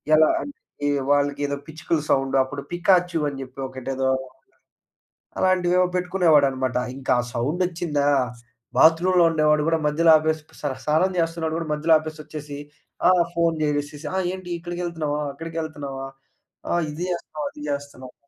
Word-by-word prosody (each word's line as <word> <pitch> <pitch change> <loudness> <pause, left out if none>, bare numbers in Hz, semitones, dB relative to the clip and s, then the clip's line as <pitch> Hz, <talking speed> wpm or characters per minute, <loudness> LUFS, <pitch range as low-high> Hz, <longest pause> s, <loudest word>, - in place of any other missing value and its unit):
ఎలా 155 0 +6 0.2
అంటే 285 - -8 0.6
వాళ్లకేదో 145 0 +1
పిచ్చుకల 160 0 -2
సౌండ్ 135 0 +1
అప్పుడు 140 +2 -6
పికాచు 175 -1 +2
అని 140 -1 -8
చెప్పి 130 +1 -13
ఒకటేదో 130 0 -2 1.3
అలాంటివేవో 180 -1 +3
పెట్టుకునేవాడన్నమాట. 150 -9 +2 0.2
ఇంకా 135 -1 0 0.2
సౌండ్ 145 +10 -1
వచ్చిందా? 165 -5 -1 0.7
బాత్రూమ్‌లో 175 +3 +5
ఉండేవాడు 150 -1 +3
కూడా 165 0 +2
మధ్యలో 160 +2 +4
ఆపేసి, 155 0 -1 0.4
స్నానం 160 +5 +2
చేస్తున్నవాడు 165 -1 -1
కూడా 165 - -4
మధ్యలో 160 +2 +3
ఆపేసి 155 0 -7
వచ్చేసి 150 -1 -8 0.5
ఆహ్, 180 -1 +5
ఫోన్ 170 -1 +2
చేసేసి, 145 0 -2
"ఆ! - - -2 0.2
ఏంటి? 185 -1 -8
ఇక్కడికి 175 +1 -6
వెళ్తున్నావా? 155 -4 -2
అక్కడికి 165 +3 -7
వెళ్తున్నావా? 140 -4 -6 0.6
ఆహ్, 175 0 +1
ఇది 155 +4 -5
చేస్తున్నావు, 155 -4 -4
అది 150 - -13
చేస్తున్నావు" 140 -3 -6
155 Hz, 130 wpm, -23 LUFS, 145-170 Hz, 1.3 s, ఎలా